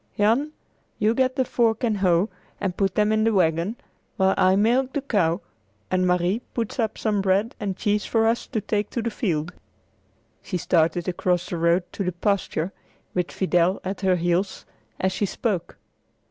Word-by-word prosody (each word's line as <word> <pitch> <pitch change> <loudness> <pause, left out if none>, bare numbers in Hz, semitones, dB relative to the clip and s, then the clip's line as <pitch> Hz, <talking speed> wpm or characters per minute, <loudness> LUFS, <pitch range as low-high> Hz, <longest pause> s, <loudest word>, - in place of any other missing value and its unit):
"Jan, 235 +9 +2 0.4
you 215 +1 +2
get 255 +1 +1
the 260 -2 +1
fork 230 -2 +1
and 220 -3 +1
hoe 185 +1 +2 0.3
and 185 -3 -2
put 195 -2 0
them 210 0 +3
in 215 0 +2
the 225 - +3
wagon, 170 +3 +2 0.4
while 190 0 +3
I 185 0 +4
milk 245 +6 +2
the 285 - -1
cow 185 -9 +1 0.5
and 185 0 +2
Marie 180 +5 +1
puts 230 +1 -3
up 220 -2 0
some 210 -3 0
bread 195 +4 +1
and 200 -3 -3
cheese 210 -1 +1
for 225 -1 +1
us 230 +1 +1
to 220 -5 -2
take 210 0 -1
to 235 - -3
the 235 - -1
field." 175 - -2 0.9
She 185 - -3
started 170 0 +1
across 180 0 0
the 175 - -3
road 170 +2 +3
to 200 - -2
the 180 -1 -1
pasture, 190 -1 -1 0.4
with 180 -1 -1
Fidel 180 0 +1
at 190 +2 -4
her 190 -2 +3
heels, 175 +2 -1 0.3
as 190 - +1
she 200 +2 -1
spoke. 195 -2 -2
195 Hz, 180 wpm, -24 LUFS, 180-220 Hz, 0.9 s, I